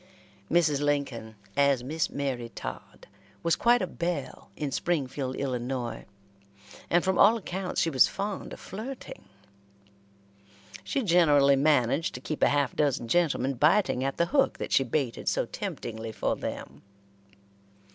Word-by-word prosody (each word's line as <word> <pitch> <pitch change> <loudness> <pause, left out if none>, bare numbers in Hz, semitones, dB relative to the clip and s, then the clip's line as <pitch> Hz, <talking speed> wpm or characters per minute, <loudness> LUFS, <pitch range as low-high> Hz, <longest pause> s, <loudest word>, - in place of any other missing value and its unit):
Mrs. 155 -4 +3
Lincoln, 135 -7 -2 0.2
as 140 -3 +3
Miss 155 +5 -1
Mary 130 -4 -3
Todd, - - -8 0.4
was 170 0 +3
quite 240 -3 +3
a - - +1
belle 170 -7 -4
in 145 -3 -3
Springfield, 135 -5 -2
Illinois, 125 -2 -3 0.8
and 175 0 +3
from 190 -1 0
all 230 - +7
accounts 190 -3 -3
she 165 - +1
was 130 -3 +6
fond 200 +1 -4
of - - -8
flirting. 235 +7 -8 1.6
She 275 - -1
generally 150 -7 +5
managed 145 +1 +2
to - - -5
keep 150 +4 -5
a - - +5
half 145 -2 +1
dozen 140 -5 0
gentlemen 140 -3 +2
biting 150 - +2
at 135 0 -2
the 170 - +3
hook 275 -2 +3
that - - -5
she 135 - +4
baited 130 -1 -1
so - - 0
temptingly 110 0 -6
for - - -1
them. - - -7
145 Hz, 140 wpm, -28 LUFS, 130-175 Hz, 1.6 s, all